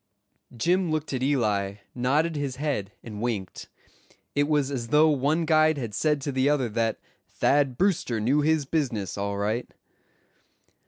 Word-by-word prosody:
Jim 180 +7 +1
looked 155 -2 -2
at 130 - -2
Eli, 105 -8 +1 0.2
nodded 145 +7 +1
his 140 -3 -3
head, 135 -9 -2
and 105 -2 -7
winked. 110 -6 -4 0.6
It 145 0 +2
was 145 -2 +1
as 120 -4 -3
though 150 +5 +5
one 150 +4 +1
guide 155 -1 +4
had 115 -6 -4
said 150 +5 +1
to 140 - -3
the 130 +1 +2
other 135 -5 +1
that 115 +1 -1 0.3
Thad 140 -3 +1
Brewster 170 - +1
knew 130 +8 +2
his 155 -1 +2
business, 125 - -2
all 100 0 -3
right. 110 +4 -2
135 Hz, 155 wpm, -26 LUFS, 115-150 Hz, 0.6 s, though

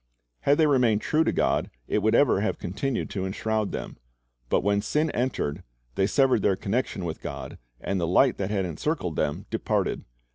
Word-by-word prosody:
Had 140 +1 +3
they 160 - +5
remained 125 -7 +3
true 160 +1 +2
to - - +1
God, - - +1 0.2
it - - +1
would 110 +2 +2
ever 120 -8 +4
have 110 - -1
continued 105 +8 -2
to 95 - -3
enshroud 110 +2 -1
them. - - -6 0.5
But - - +2
when 100 0 +2
sin 150 +8 0
entered, 120 - -2 0.3
they 95 +9 +1
severed 130 -2 +3
their 95 -1 +3
connection 100 -1 -2
with 80 - -5
God, - - -7 0.2
and 95 -2 -2
the 85 - 0
light 125 +9 +4
that 95 -1 -2
had 100 -3 0
encircled 90 - -2
them 75 - -1
departed. - - -1
105 Hz, 185 wpm, -26 LUFS, 95-130 Hz, 0.5 s, they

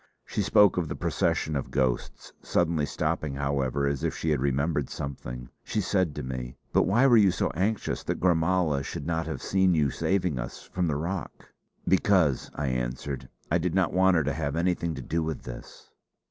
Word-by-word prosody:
She - - -2
spoke 105 -3 +5
of 85 -3 0
the - - -4
procession 75 - 0
of 70 - -2
ghosts; 65 -3 -1
suddenly 80 -4 +1
stopping, 75 -2 -2
however, 70 -1 0
as 70 -1 -1
if - - -1
she 80 - -1
had 75 - +1
remembered 70 +1 0
something, 60 -3 -6
she - - -2
said 95 -6 +1
to - - -4
me: 65 -1 -5 0.2
"But - - +4
why 115 +8 +4
were 120 -4 +7
you 100 -3 +6
so - - 0
anxious 100 +6 -1
that - - -2
Gormala 85 -3 +2
should 70 - -5
not 80 -1 -1
have 80 - -5
seen 95 -2 +3
you 75 -3 +2
saving 90 -8 0
us 60 +1 -6
from 90 -1 -2
the 75 - 0
rock?" 85 +5 -5 0.3
"Because," 90 -7 +3
I 70 -2 -1
answered, 65 +1 -3 0.2
"I 85 - +3
did 90 +1 -1
not 95 -3 +2
want 95 0 +4
her 80 - +3
to 70 0 -1
have 70 -1 -2
anything 85 -1 0
to - - -6
do 85 +1 -1
with 80 -1 -3
this." - - -10
80 Hz, 195 wpm, -27 LUFS, 70-90 Hz, 0.3 s, were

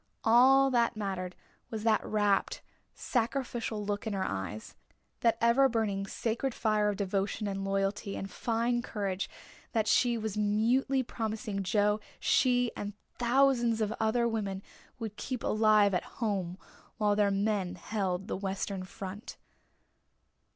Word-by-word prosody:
All 265 +4 +6
that 235 -2 +2
mattered 190 -3 -3 0.3
was 220 -2 -5
that 220 -2 +3
rapt, 205 -2 +1 0.3
sacrificial 235 -3 -2
look 205 +2 -2
in 215 - -2
her 190 -1 -1
eyes 95 +3 -5 0.5
that 230 -1 +3
ever 240 +4 +5
burning, 205 -4 -1
sacred 235 +5 -2
fire 215 -2 +2
of 205 - -1
devotion 195 +1 -1
and 195 -1 -3
loyalty 195 +1 -1
and 195 - -4
fine 235 +1 0
courage 200 -5 -3 0.4
that 220 -2 +1
she 240 -2 +3
was 215 -2 -3
mutely 230 +6 +2
promising 220 -3 -3
Joe 210 +2 +2 0.2
she 245 -2 +3
and 205 0 -5 0.3
thousands 240 -2 +3
of 215 0 0
other 230 +2 +2
women 200 -4 -3 0.3
would 220 -3 -6
keep 255 -2 -4
alive 215 -2 +4
at 180 - +1
home 195 -6 -1 0.4
while 210 -1 +2
their 205 -1 +3
men 195 -2 0
held 190 0 -2
the - - -2
Western 195 0 -3
front. 195 +2 -8
215 Hz, 135 wpm, -30 LUFS, 195-235 Hz, 0.5 s, All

